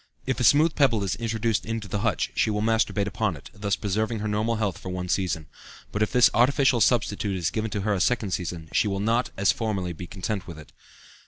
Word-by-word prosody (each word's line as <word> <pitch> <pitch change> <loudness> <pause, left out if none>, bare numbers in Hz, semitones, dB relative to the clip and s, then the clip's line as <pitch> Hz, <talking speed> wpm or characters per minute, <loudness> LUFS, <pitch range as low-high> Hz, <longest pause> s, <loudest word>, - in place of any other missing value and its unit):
If 130 0 -1
a - - 0
smooth 155 +6 +5
pebble 120 -8 +2
is 95 - -1
introduced 115 -1 -1
into 115 -2 -4
the 105 +2 -2
hutch, 105 -1 0
she - - +1
will 105 0 -1
masturbate 110 -2 +1
upon 100 -2 -1
it, - - -14
thus 100 -1 -1
preserving 110 +4 -1
her 105 0 -3
normal 105 +2 0
health 105 -4 -2
for 95 - -7
one 90 0 -4
season. 85 -5 -1 0.5
But 105 - -3
if 110 - +1
this 125 -1 +6
artificial 130 0 +3
substitute 105 -4 +1
is 85 -3 -1
given 110 0 -2
to 105 -1 -3
her 105 +1 0
a 95 - -1
second 110 -4 +1
season, 85 -3 -4
she - - +2
will 95 -1 -1
not, 115 +4 +1
as 95 -2 +4
formerly, 95 -4 -2
be 85 +2 -8
content 100 -1 -4
with 85 -3 -8
it." 75 - -13
105 Hz, 230 wpm, -25 LUFS, 95-115 Hz, 0.5 s, this